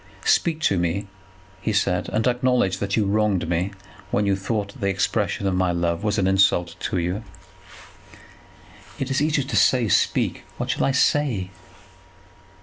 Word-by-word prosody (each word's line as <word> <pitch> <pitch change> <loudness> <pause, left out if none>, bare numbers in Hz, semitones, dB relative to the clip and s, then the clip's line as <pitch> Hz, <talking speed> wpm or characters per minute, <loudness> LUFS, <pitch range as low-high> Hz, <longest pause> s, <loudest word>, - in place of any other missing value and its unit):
"Speak 170 - +2
to 95 - +2
me," 85 +4 -1 0.6
he 110 - -1
said, 90 -4 0
"and 110 +1 0
acknowledge 125 -6 +1
that 100 +1 -1
you 105 - +2
wronged 100 -4 +1
me 90 +3 0 0.4
when 105 - +1
you 100 -1 +2
thought 100 +1 -2
that - - -14
the 100 - 0
expression 95 +1 -1
of 95 - +1
my 90 -1 +1
love 85 +1 -1
was 105 0 0
an 95 - +1
insult 95 -3 +2
to - - -2
you." 90 +5 -2 1.7
"It 135 0 -3
is 135 - +1
easy 150 -2 +1
to 135 - -5
say, 125 -3 +4
speak. - - +1
What - - -2
shall - - 0
I - - +2
say?" 130 -8 +1
100 Hz, 165 wpm, -23 LUFS, 95-125 Hz, 1.7 s, say